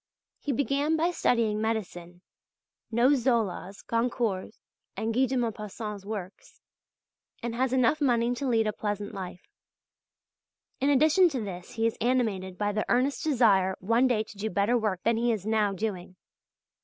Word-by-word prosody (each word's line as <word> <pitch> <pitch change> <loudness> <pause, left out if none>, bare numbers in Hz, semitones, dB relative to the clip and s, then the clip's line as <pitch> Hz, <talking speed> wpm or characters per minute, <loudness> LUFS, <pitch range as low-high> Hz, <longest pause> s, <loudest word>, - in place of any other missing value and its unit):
He 290 - -3
began 280 +4 +1
by 335 +3 +1
studying 225 -9 +1
medicine; 180 -6 -4 0.7
knows 255 +5 +4
Zola's, 220 -6 -1
Goncourt's, 230 -4 -1 0.4
and 225 +1 -1
Guy 260 +3 +3
de 260 +1 -1
Maupassant's 210 -3 -4
works, 200 -3 -7 0.8
and 235 -1 -2
has 255 +2 0
enough 260 +4 +2
money 240 -3 +2
to 270 +3 -3
lead 225 -3 +2
a 215 - 0
pleasant 205 0 -4
life. 185 -2 -7 1.3
In 275 - +2
addition 310 +6 +5
to 265 -6 -3
this 185 +1 -7
he 225 -1 -1
is 230 - -1
animated 215 -7 0
by 205 0 0
the 215 +1 -1
earnest 265 +7 +1
desire 210 - +3
one 230 +6 +3
day 225 -4 +1
to 210 -1 -14
do 220 +2 -2
better 200 +5 +1
work 210 -6 -1
than 230 0 +2
he 240 +1 +2
is 210 -4 -3
now 215 -2 +2
doing. 190 -3 -4
225 Hz, 155 wpm, -28 LUFS, 205-250 Hz, 1.3 s, addition